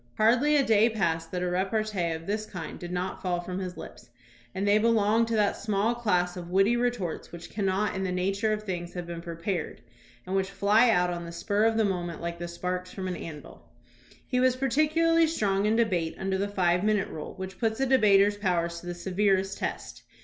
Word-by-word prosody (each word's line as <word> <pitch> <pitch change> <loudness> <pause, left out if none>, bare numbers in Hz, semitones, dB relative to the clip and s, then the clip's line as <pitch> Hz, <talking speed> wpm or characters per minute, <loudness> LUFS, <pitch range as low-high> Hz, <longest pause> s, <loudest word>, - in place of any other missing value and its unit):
Hardly 250 +7 +4
a 280 -2 +4
day 220 +1 +4
passed 165 -7 -1
that 180 -1 -2
a - - 0
repartee 190 0 -1
of 160 0 -7
this 215 +2 -2
kind 170 -4 -7
did 175 0 -7
not 180 +1 -3
fall 180 -2 -1
from 180 +1 -5
his 180 -1 -5
lips, - - -11 0.5
and 195 +2 -1
they 205 +1 +5
belonged 225 0 +3
to 230 - -1
that 210 -2 +2
small 215 +2 0
class 180 -7 0
of 175 -1 -7
witty 195 +5 +3
retorts 240 -8 -2
which 170 0 -10
cannot 200 0 0
in 190 - -2
the 185 - -1
nature 195 +4 0
of 215 0 -2
things 175 -4 -5
have 175 -1 -4
been 170 0 -6
prepared 170 0 -4 0.4
and 185 +1 -3
which 190 0 0
fly 210 +4 +4
out 180 -5 +3
on 175 -1 -4
the 170 - -7
spur 205 +5 0
of 225 0 +2
the 220 - +3
moment 175 -4 -2
like 170 0 -5
the 175 - -4
sparks 180 +1 -4
from 190 -1 -5
an 180 - -3
anvil. 155 -4 -10 0.6
He 250 - 0
was 255 0 +3
particularly 310 +5 +3
strong 205 -9 0
in 220 - +2
debate 185 -8 0
under 190 0 -2
the 200 - 0
five 180 -2 +1
minute 210 -2 +1
rule, 155 - -7
which 190 -1 -7
puts 220 -1 0
a 270 - +2
debater's 205 -6 +4
powers 170 -4 -1
to 175 - -11
the 175 - -4
severest 195 +1 0
test. - - -5
195 Hz, 215 wpm, -27 LUFS, 180-220 Hz, 0.6 s, they